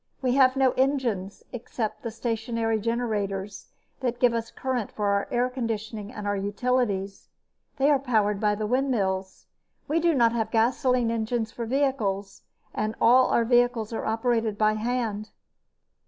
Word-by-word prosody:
We 255 -2 0
have 260 -1 +5
no 265 -1 +3
engines 245 -8 -1
except 230 -2 -4
the 230 - -4
stationary 225 0 -2
generators 205 -4 -2 0.3
that 245 -2 -2
give 245 -2 +4
us 230 0 -2
current 255 -5 -3
for 205 -1 -1
our 200 0 +1
air 245 0 +1
conditioning 220 -4 -4
and 210 - -7
our 205 0 0
utilities. 200 -1 -1 0.5
They 280 +2 +3
are 285 - +4
powered 215 -6 +1
by 210 0 +2
the 215 +1 -3
windmills. 210 -7 -1 0.4
We 315 +3 +1
do 335 -1 +2
not 235 -3 +4
have 225 -2 -1
gasoline 240 +1 +2
engines 225 0 -1
for 235 0 -5
vehicles, 220 -7 -1 0.3
so 215 +1 -2
our 240 0 +4
vehicles 240 -2 +2
are - - -3
operated 225 -1 0
by 215 0 +3
hand." 215 -2 -2
230 Hz, 150 wpm, -26 LUFS, 210-250 Hz, 0.5 s, have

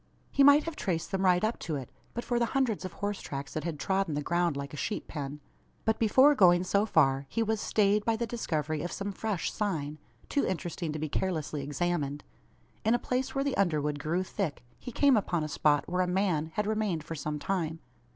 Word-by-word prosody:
He 280 - +4
might 285 +2 +7
have 330 -1 -5
traced 170 - -2
them 195 -1 0
right 180 0 +4
up 220 +2 0
to 160 - -3
it, 135 -4 -6 0.2
but 235 - -3
for 240 -1 0
the 235 - +2
hundreds 230 -8 0
of 185 - -6
horse 205 +2 -3
tracks 140 0 -6
that 155 - -3
had 165 -2 -3
trodden 190 -4 0
the 150 - -2
ground 170 -3 +1
like 140 +1 -5
a - - -4
sheep 205 +8 -3
pen. 145 -1 -5 0.4
But 220 0 +1
before 260 +6 +6
going 180 -7 +5
so 200 +3 +1
far, 135 -6 +3
he 230 - 0
was 220 -1 -1
stayed 205 0 +2
by 230 +1 +1
the 235 +1 -1
discovery 155 - -2
of 175 - -4
some 200 0 -3
fresh 200 -3 -2
"sign" 155 -8 -2 0.3
too 285 - +1
interesting 175 -2 -2
to - - -3
be 155 +1 -2
carelessly 155 -3 -2
examined. 145 -1 -2 0.6
In 225 +2 +4
a - - +3
place 255 +2 -2
where 275 - +1
the 280 -1 -1
underwood 150 -6 +1
grew 170 +6 0
thick, 185 -8 -3 0.2
he 250 - -7
came 280 +3 +4
upon 175 -6 0
a - - -2
spot 145 -1 +2
where 180 +1 0
a 180 - +1
man 180 -4 +1
had 210 - 0
remained 210 -7 -1
for 165 - -6
some 150 -1 -3
time. 165 0 -2
180 Hz, 220 wpm, -30 LUFS, 155-215 Hz, 0.6 s, might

